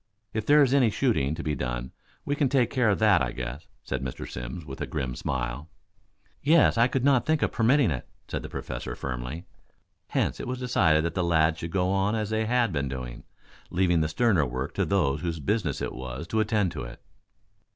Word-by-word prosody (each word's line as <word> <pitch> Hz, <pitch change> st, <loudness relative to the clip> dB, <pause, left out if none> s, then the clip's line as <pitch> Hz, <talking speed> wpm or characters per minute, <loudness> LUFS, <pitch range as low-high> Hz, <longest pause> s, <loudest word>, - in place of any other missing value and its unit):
If 110 Hz, -1 st, -3 dB
there 150 Hz, 0 st, +7 dB
is 135 Hz, -1 st, +2 dB
any 130 Hz, -5 st, +5 dB
shooting 105 Hz, -, +1 dB
to 85 Hz, -, -6 dB
be 75 Hz, -, -1 dB
done, 60 Hz, -2 st, -3 dB, 0.3 s
we 145 Hz, -, 0 dB
can 145 Hz, -3 st, +1 dB
take 125 Hz, -4 st, +2 dB
care 125 Hz, -5 st, +2 dB
of 100 Hz, -, +2 dB
that, 105 Hz, -6 st, +4 dB
I -, -, 0 dB
guess," 65 Hz, +4 st, -6 dB, 0.2 s
said 65 Hz, -1 st, -3 dB
Mr. 65 Hz, -1 st, -5 dB
Simms, 65 Hz, +7 st, -6 dB
with 65 Hz, -2 st, -8 dB
a -, -, -2 dB
grim 65 Hz, -1 st, -3 dB
smile. 65 Hz, +4 st, -3 dB, 0.7 s
"Yes, 160 Hz, +2 st, +5 dB
I 115 Hz, +1 st, +5 dB
could 130 Hz, -1 st, -1 dB
not 135 Hz, -3 st, +3 dB
think 155 Hz, -2 st, +2 dB
of -, -, +1 dB
permitting 120 Hz, -, +3 dB
it," 65 Hz, -, -5 dB, 0.2 s
said -, -, -3 dB
the -, -, -8 dB
Professor -, -, -5 dB
firmly; 65 Hz, +6 st, -5 dB, 0.6 s
hence -, -, -1 dB
it -, -, -5 dB
was 130 Hz, 0 st, -2 dB
decided 85 Hz, -11 st, +2 dB
that 85 Hz, -, -2 dB
the 90 Hz, -, 0 dB
lads 80 Hz, -1 st, +2 dB
should 85 Hz, -, -4 dB
go 90 Hz, +1 st, 0 dB
on 100 Hz, +2 st, +1 dB
as 110 Hz, -1 st, -2 dB
they 110 Hz, 0 st, 0 dB
had 120 Hz, -4 st, +2 dB
been 70 Hz, -2 st, -1 dB
doing, 65 Hz, -2 st, -6 dB, 0.4 s
leaving 85 Hz, -2 st, +2 dB
the 80 Hz, -, 0 dB
sterner 90 Hz, -, +2 dB
work 65 Hz, +2 st, -4 dB
to -, -, 0 dB
those 75 Hz, -8 st, +1 dB
whose 85 Hz, -2 st, -3 dB
business 80 Hz, -1 st, -1 dB
it -, -, -3 dB
was 65 Hz, +4 st, -6 dB
to 110 Hz, -, 0 dB
attend 105 Hz, -4 st, +1 dB
to -, -, -6 dB
it. -, -, -8 dB
85 Hz, 215 wpm, -27 LUFS, -, 0.7 s, there